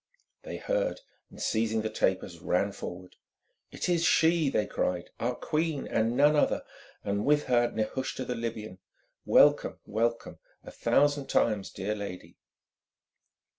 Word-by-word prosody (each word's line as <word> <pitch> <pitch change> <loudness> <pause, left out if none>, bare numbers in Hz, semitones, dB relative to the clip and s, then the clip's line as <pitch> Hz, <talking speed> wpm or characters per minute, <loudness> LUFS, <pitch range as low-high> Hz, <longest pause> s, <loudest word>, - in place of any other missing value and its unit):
They - - -7
heard, - - -1 0.3
and - - -14
seizing 110 -1 0
the 110 - -1
tapers, 95 -4 -1
ran 90 +4 0
forward. 90 -1 -8 0.5
"It - - -4
is 170 -2 +2
she!" 165 -3 +4
they 105 - +1
cried, 90 -1 -2
"our 125 +1 -1
queen 155 -2 -2
and 115 +2 0
none 145 +2 +5
other, 150 - +2 0.4
and 100 +1 -1
with 150 0 +3
her 120 -1 +2
Nehushta 130 +4 -3
the 125 - -2
Libyan! 110 -5 -5 0.5
Welcome, - - +5
welcome, 115 +2 -2 0.2
a - - -10
thousand 145 -1 +2
times, 105 -4 +1
dear 100 +2 -3
lady!" 100 -3 -8
115 Hz, 135 wpm, -29 LUFS, 100-145 Hz, 0.5 s, none